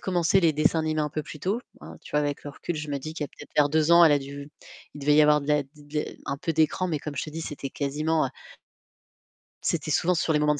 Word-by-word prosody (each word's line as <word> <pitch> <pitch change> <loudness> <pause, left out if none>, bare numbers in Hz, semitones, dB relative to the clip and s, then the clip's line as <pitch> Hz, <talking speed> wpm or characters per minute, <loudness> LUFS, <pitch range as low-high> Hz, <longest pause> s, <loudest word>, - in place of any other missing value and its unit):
commencé 180 0 +2
les 165 -4 +4
dessins 155 +2 +2
animés 155 -1 0
un 150 - 0
peu 150 0 -4
plus 150 - -10
tôt, 205 +6 -1 0.2
hein, - - -10
tu - - -12
vois, 150 - +3
avec 145 -1 -2
le 145 - -5
recul, 160 +4 -5
je 155 0 -5
me 140 -1 -2
dis 155 +3 -6
qu'il 150 - -3
y - - -4
a - - -21
peut-être 150 - -12
vers 145 -1 +5
2 155 +2 +2
ans, 170 0 +8
elle 160 - +6
a 145 - +3
dû 140 +1 -8 0.5
il 145 - -9
devait 145 +1 +3
y 155 - +7
avoir 150 0 +5
de 140 - -8
la, 150 -1 +3
d - - -27
d 150 0 -5
un - - -3
peu 165 +3 -2
d'écran, 160 +3 +1
mais 155 -5 -2
comme 145 -1 -6
je - - -1
te 155 - -8
dis, 160 +2 -6
c'était 145 -3 -5
quasiment, 150 +2 0
heu - - -4 1.3
c'était 155 -2 -1
souvent 180 +4 +2
sur 160 -1 +1
les 150 - +3
moments 150 0 +3
de 145 - -6
150 Hz, 295 wpm, -26 LUFS, 145-160 Hz, 1.3 s, ans